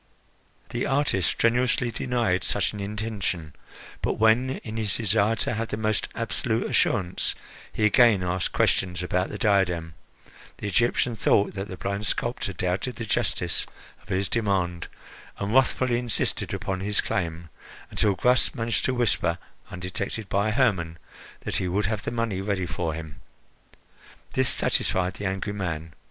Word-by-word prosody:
The 120 - -2
artist 135 - +2
strenuously 120 +1 +2
denied 115 -8 0
such - - 0
an 105 - -6
intention; 100 -6 -3 0.5
but - - +1
when, 110 +4 +4
in 110 -1 -6
his 110 -3 0
desire 110 0 +2
to - - -1
have 115 +1 -2
the 105 - -3
most 110 -1 0
absolute 115 0 -1
assurance, 95 -5 +2 0.4
he 110 - +1
again 105 -3 +5
asked 90 0 -1
questions 90 -2 +1
about 90 +1 0
the 105 - -5
diadem, 90 -6 +1 0.6
the - - -7
Egyptian 120 +3 +2
thought 100 -1 +3
that 100 +1 -4
the 95 - -7
blind 100 +2 -2
sculptor 120 -2 -1
doubted 90 +7 -2
the 115 -1 -5
justice 105 - 0 0.3
of - - -22
his 95 +1 0
demand, 95 -6 0 0.5
and 100 +2 -2
wrathfully 130 -2 +3
insisted 120 -3 -1
upon 95 -1 -2
his 100 +2 -1
claim, 85 -2 -2 0.4
until 100 -2 +2
Gras 125 +5 +4
managed 115 -1 0
to 130 - +1
whisper, 105 -8 +1 0.3
undetected 95 +3 -4
by 100 +2 +2
Hermon, 100 -9 +1 0.4
that - - -2
he 90 - -1
would 95 +3 0
have 105 0 -1
the - - 0
money 115 -5 -1
ready 100 -2 -1
for 80 -1 -2
him. 80 -3 -8 1.1
This - - +3
satisfied 90 0 +1
the 100 - -2
angry 95 +2 -2
man. 80 -5 -4
100 Hz, 150 wpm, -26 LUFS, 90-115 Hz, 1.1 s, again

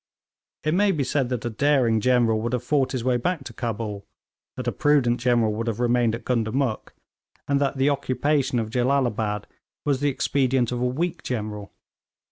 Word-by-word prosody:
It 155 - +1
may 200 +2 +3
be 150 -6 0
said 135 -1 0
that 125 -3 -3
a - - 0
daring 125 -2 +2
general 120 -2 +3
would 120 +2 -2
have 125 - -1
fought 140 -3 +1
his 125 -3 -2
way 125 -1 +2
back 160 +4 -2
to - - -9
Cabul, 110 -4 -4 0.5
that 125 -1 -5
a - - +2
prudent 130 -5 +2
general 120 -3 +2
would 115 +2 -3
have 115 -1 -2
remained 120 -2 +2
at 115 - -10
Gundamuk, 120 0 -1 0.5
and 140 0 +1
that 140 0 0
the 135 +2 +3
occupation 140 -1 0
of 110 -2 -2
Jellalabad 120 -5 0 0.4
was 140 -3 +1
the 145 +1 +1
expedient 130 -2 +1
of 125 0 -2
a - - +1
weak 165 +6 -2
general. 105 -4 -4
125 Hz, 185 wpm, -24 LUFS, 115-140 Hz, 0.5 s, may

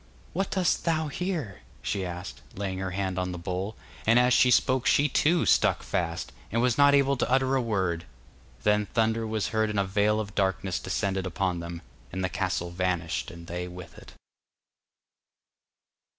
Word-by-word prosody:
'What 195 +3 -1
dost 185 -3 +1
thou 160 -2 0
here?' 160 - -3 0.2
she 100 -2 -1
asked, 85 -8 -6
laying 95 -1 -3
her 95 -1 -2
hand 95 0 -2
on 90 0 -2
the 90 - -5
bowl, 90 +4 -3 0.3
and 115 +1 +6
as 125 +1 +5
she 125 - +5
spoke 130 +1 +3
she 145 - +4
too 165 +3 +2
stuck - - +3
fast, 85 -1 -2 0.2
and 115 - +1
was 125 0 +3
not 140 +1 +6
able 140 0 +3
to - - 0
utter 130 0 +3
a 130 - +2
word. 95 -7 -1 0.6
Then 105 0 +2
thunder 115 +1 +1
was 110 -1 -1
heard 110 0 +1
and 105 -1 -1
a - - +3
veil 105 +3 +2
of 105 -1 -4
darkness 95 -3 0
descended 95 -1 -1
upon 90 0 -1
them, 85 0 -7 0.3
and 95 +1 -3
the 95 - 0
castle 90 -2 -2
vanished 90 -1 -1
and 85 -2 -10
they 90 +1 -4
with 90 0 -10
it. - - -13
100 Hz, 180 wpm, -27 LUFS, 90-125 Hz, 0.6 s, and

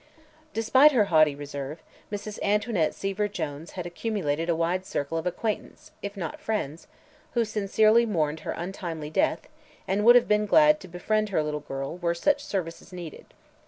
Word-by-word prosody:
Despite 260 +7 +5
her 220 -5 +4
haughty 155 -2 +5
reserve, 145 +1 -6 0.3
Mrs. 205 0 -6
Antoinette 205 -5 +1
Seaver 195 +1 -1
Jones 160 -4 -5
had 180 -2 -5
accumulated 175 -4 -2
a 170 - +3
wide 170 +3 0
circle 145 -3 -3
of 165 +2 -1
acquaintances 225 - -4
if 200 0 -6
not 165 -5 -5
friends 170 -8 -3 0.5
who 235 -1 +3
sincerely 215 +2 +3
mourned 160 -6 0
her - - -4
untimely 170 -4 -5
death - - +1 0.4
and 200 +2 +1
would 240 +2 +8
have 245 - +5
been 210 0 +2
glad 300 +5 +6
to - - -11
befriend 215 +5 -1
her 160 -6 +1
little 150 0 -2
girl 135 +3 -5
were 170 -1 0
such 290 +10 +1
services 180 -5 -4
needed. 175 -4 -9
185 Hz, 165 wpm, -26 LUFS, 160-215 Hz, 0.5 s, would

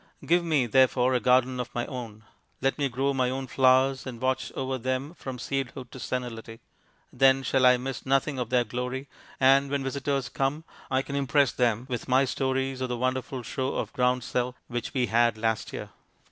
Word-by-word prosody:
Give 175 +1 +3
me, 155 -6 +2
therefore, 130 +1 +3
a 125 - +3
garden 125 +2 +3
of 125 -1 -3
my 120 - -1
own. 115 -5 -7 0.4
Let 135 +3 0
me 140 -1 +1
grow 135 +3 0
my 130 -2 +1
own 130 +1 -3
flowers, 130 +1 +3
and 120 -3 -6
watch 130 +1 -1
over 130 0 -3
them 130 +5 -2
from 130 -7 -7
seedhood 130 -1 -4
to 130 - -9
senility. 115 -3 -5 0.5
Then 135 0 +4
shall 130 -1 +3
I 125 0 +6
miss 130 0 -5
nothing 135 +1 +1
of 120 -2 -3
their 125 -1 +3
glory, 125 +4 -4 0.3
and 135 +1 +5
when 140 -1 -1
visitors 135 0 -1
come 140 +4 -1 0.3
I 130 0 +1
can 140 - -6
impress 140 -1 +2
them 120 -1 0
with 125 -3 -4
my 130 +1 +4
stories 130 0 -1
of 130 - -2
the 125 - -2
wonderful 130 0 -2
show 130 +3 -3
of - - -3
groundsel 125 0 0
which 120 -1 -4
we 125 -2 +2
had 115 -1 +2
last 110 0 -1
year. - - -7
130 Hz, 190 wpm, -27 LUFS, 125-135 Hz, 0.5 s, I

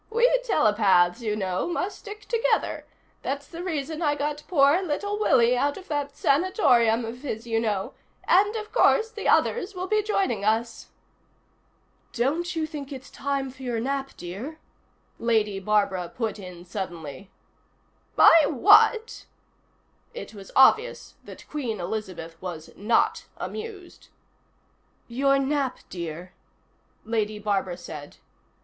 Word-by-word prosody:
"We 470 +2 +4 0.2
telepaths, 210 - +3
you 215 -2 -1
know, 190 - -2
must 355 +3 -3
stick 420 0 -9
together. 465 +2 -1 0.3
That's 280 +1 -4
the 340 +1 -8
reason 315 -2 -3
I 295 -3 +2
got 295 +1 -3
poor 295 +1 +4
little 405 +5 -2
Willie 250 - +4
out 285 +3 0
of 385 - -12
that 285 -2 -3
sanatorium 255 - +3
of 230 +2 -7
his, 235 -5 -5
you 225 -1 0
know 210 -4 -2 0.3
and, 410 +4 +3
of 430 -1 -5
course, 450 -1 +3
the - - -5
others 410 -3 +2
will 365 0 -3
be 430 +3 +1
joining 390 - -1
us." 225 +2 -1 1.3
"Don't 315 +8 -1
you 320 -1 0
think 295 -3 -8
it's 265 -1 -9
time 275 -1 -2
for 260 - -16
your 245 -3 -2
nap, 270 +3 -3
dear?" 205 - -7 0.6
Lady 215 -4 +1
Barbara 195 -3 0
put 220 -3 -4
in 180 -2 -10
suddenly. 175 -2 -6 0.9
"My 325 -3 +7
what?" 435 - +4 0.9
It 485 - -8
was 195 -2 -11
obvious 445 - +4
that - - -12
Queen 245 -9 -4
Elizabeth 175 -4 -5
was 170 -4 -7
Not 215 +4 +1
Amused. 430 -5 -8 1.0
"Your 275 +3 +2
nap, 275 -1 0
dear," 170 0 -6 0.7
Lady 215 -1 -1
Barbara 195 -4 -1
said. 150 -4 -9
265 Hz, 130 wpm, -25 LUFS, 210-340 Hz, 1.3 s, My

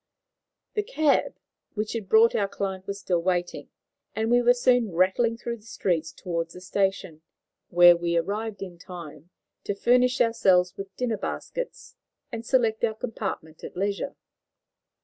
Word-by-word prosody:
The 420 - +1
cab 315 - +1 0.4
which 210 0 -2
had 220 -5 -5
brought 225 +2 +6
our 200 - +1
client 195 -1 -4
was 200 0 -4
still 175 -3 0
waiting, 175 0 -2 0.5
and 220 +1 0
we 245 0 +5
were 245 +1 +5
soon 245 -3 +3
rattling 190 +7 +2
through 235 0 -4
the - - -21
streets 175 -7 -2
towards 170 -1 -4
the 180 - -10
station, 190 -4 -1 0.5
where 175 0 +8
we 170 0 -1
arrived 205 +4 -2
in 175 -3 -9
time 170 -3 -10 0.3
to 205 - -2
furnish 250 +4 +3
ourselves 190 -6 +3
with 195 -1 -8
dinner 240 -3 -1
baskets - - -6 0.3
and 230 -2 -5
select 230 -3 +1
our 220 -2 +1
compartment 195 -8 -5
at - - -8
leisure. 200 +1 -2
200 Hz, 150 wpm, -26 LUFS, 180-230 Hz, 0.5 s, where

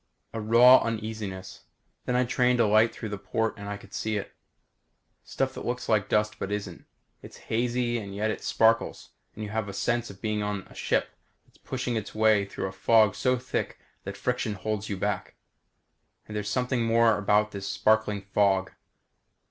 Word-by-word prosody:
A 115 - -3
raw 120 +4 +7
uneasiness. 110 -4 -5 0.4
Then 125 - 0
I 125 0 +3
trained 125 0 +2
a 115 - +5
light 110 +2 +4
through 110 - -7
the 105 -1 -5
port 110 +1 -1
and 100 0 -8
I 105 - -4
could 100 0 -17
see 110 -1 -1
it. 100 - -6 0.9
Stuff 130 -1 -2
that - - -7
looks 125 +1 -3
like 105 -3 +1
dust 105 0 +1
but 100 - -4
isn't. 105 -1 -5 0.4
It's - - -12
hazy 120 +1 0
and 100 -2 -8
yet 110 +2 0
it - - -5
sparkles 115 +1 +1 0.2
and 110 - -6
you 105 - -6
have 110 -2 -2
a - - -6
sense 120 +4 -1
of 95 - -11
being 105 -1 -1
on 105 -2 -3
a - - -17
ship - - 0 0.4
that's - - -28
pushing 125 -3 -3
its 110 -1 -6
way 110 -2 +4
through 100 - -5
a 95 - -3
fog 105 +2 +4
so 125 -1 +1
thick 125 +1 -3 0.3
the - - -5
friction 105 - -2
holds 105 +1 -3
you 100 - -2
back. 100 0 -3 0.9
And 105 - -9
there's 105 -1 -2
something 125 0 0
more 115 -1 +4
about 105 +1 +2
this 100 -1 -6
sparkling 110 -2 +1
fog. 95 -1 +1
110 Hz, 190 wpm, -27 LUFS, 100-115 Hz, 0.9 s, raw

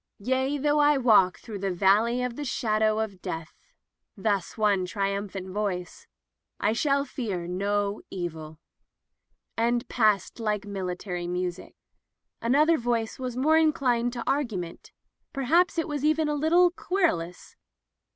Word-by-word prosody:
"Yea, 260 +6 0
though 295 +1 +2
I 295 0 +5
walk 215 -8 +4
through 215 -4 -8
the 195 0 -1
Valley 205 +7 +2
of 250 -1 -3
the 295 - -5
Shadow 215 -5 +1
of 200 -4 -5
Death'' 165 0 -7 0.3
— - - -53
thus 200 -3 0
one 205 -3 +2
trium 200 +1 -2
phant 190 -1 -7
voice 185 -3 -4 0.3
— - - -60
"I 210 - +1
shall 280 +3 +1
fear 205 -10 -4
no 200 +3 -1
evil" 160 -4 -6 0.5
— - - -52
^and 235 +1 +1
passed 215 -3 +1
like 210 -2 -1
military 180 -2 -4
music. 180 0 -4 0.7
Another 300 +7 +3
voice 235 -1 -1
was 250 -2 -4
more 310 +5 +4
inclined 250 -6 +2
to 240 -2 -4
argu 270 -8 0
ment 170 -2 -8 0.2
— - - -53
perhaps 335 +7 +2
it 330 - 0
was 290 -2 -3
even 310 +1 +2
a 300 - 0
little 335 +4 +4
querulous. 330 - -2
220 Hz, 150 wpm, -27 LUFS, 195-275 Hz, 0.7 s, I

